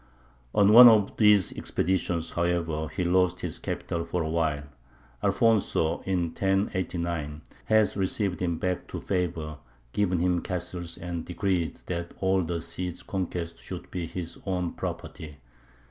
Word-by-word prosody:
On 105 Hz, +1 st, +5 dB
one 120 Hz, +1 st, +12 dB
of 105 Hz, -3 st, +3 dB
these 105 Hz, -4 st, +5 dB
expeditions, 90 Hz, -2 st, -1 dB
however, 85 Hz, -2 st, 0 dB
he 90 Hz, -, -3 dB
lost 90 Hz, 0 st, +2 dB
his -, -, -4 dB
capital 85 Hz, 0 st, -3 dB
for 85 Hz, +1 st, -2 dB
a 80 Hz, -, -3 dB
while. 80 Hz, -3 st, 0 dB, 0.6 s
Alfonso, 100 Hz, -5 st, +2 dB
in 95 Hz, -2 st, +1 dB
1089, 85 Hz, -5 st, -1 dB, 0.2 s
has 110 Hz, -1 st, +3 dB
received 95 Hz, -1 st, -1 dB
him 85 Hz, -2 st, 0 dB
back 90 Hz, +1 st, -2 dB
to -, -, -5 dB
favour, 80 Hz, -5 st, -2 dB, 0.3 s
given 95 Hz, -3 st, +1 dB
him 90 Hz, 0 st, +1 dB
castles, 90 Hz, -1 st, -4 dB
and 85 Hz, -1 st, -4 dB
decreed 90 Hz, -2 st, -1 dB
that 85 Hz, -1 st, -4 dB
all 95 Hz, 0 st, +2 dB
the 85 Hz, -1 st, -2 dB
Cid's 90 Hz, +1 st, -5 dB
conquests 90 Hz, -3 st, -4 dB
should -, -, -8 dB
be 85 Hz, -2 st, -3 dB
his 85 Hz, 0 st, -6 dB
own 90 Hz, -2 st, -1 dB
property. 75 Hz, -2 st, -6 dB
90 Hz, 140 wpm, -27 LUFS, 85-95 Hz, 0.6 s, one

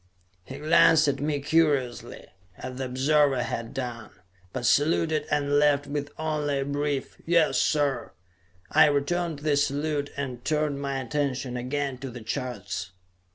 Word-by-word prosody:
He 135 Hz, -, -8 dB
glanced 155 Hz, +1 st, +5 dB
at 140 Hz, -, 0 dB
me 145 Hz, 0 st, -1 dB
curiously, 145 Hz, -5 st, 0 dB, 0.3 s
as 130 Hz, 0 st, -7 dB
the 135 Hz, -, -2 dB
observer 135 Hz, 0 st, +2 dB
had 115 Hz, 0 st, -4 dB
done, 120 Hz, -5 st, -5 dB, 0.4 s
but 120 Hz, -, -4 dB
saluted 155 Hz, +1 st, +2 dB
and 145 Hz, 0 st, +2 dB
left 145 Hz, -1 st, +3 dB
with 145 Hz, 0 st, -4 dB
only 150 Hz, -3 st, -1 dB
a -, -, -2 dB
brief, 145 Hz, -1 st, -2 dB
"Yes, 160 Hz, -6 st, +3 dB
sir!" 145 Hz, -4 st, 0 dB, 0.6 s
I -, -, +7 dB
returned 160 Hz, +3 st, 0 dB
the 150 Hz, -2 st, +3 dB
salute 145 Hz, +1 st, 0 dB
and 130 Hz, -4 st, -4 dB
turned 150 Hz, -2 st, 0 dB
my 140 Hz, -1 st, -2 dB
attention 130 Hz, -1 st, -2 dB
again 130 Hz, +1 st, -3 dB
to 135 Hz, 0 st, -6 dB
the 120 Hz, -1 st, -9 dB
charts. 110 Hz, -8 st, -4 dB
145 Hz, 145 wpm, -26 LUFS, 130-150 Hz, 0.6 s, I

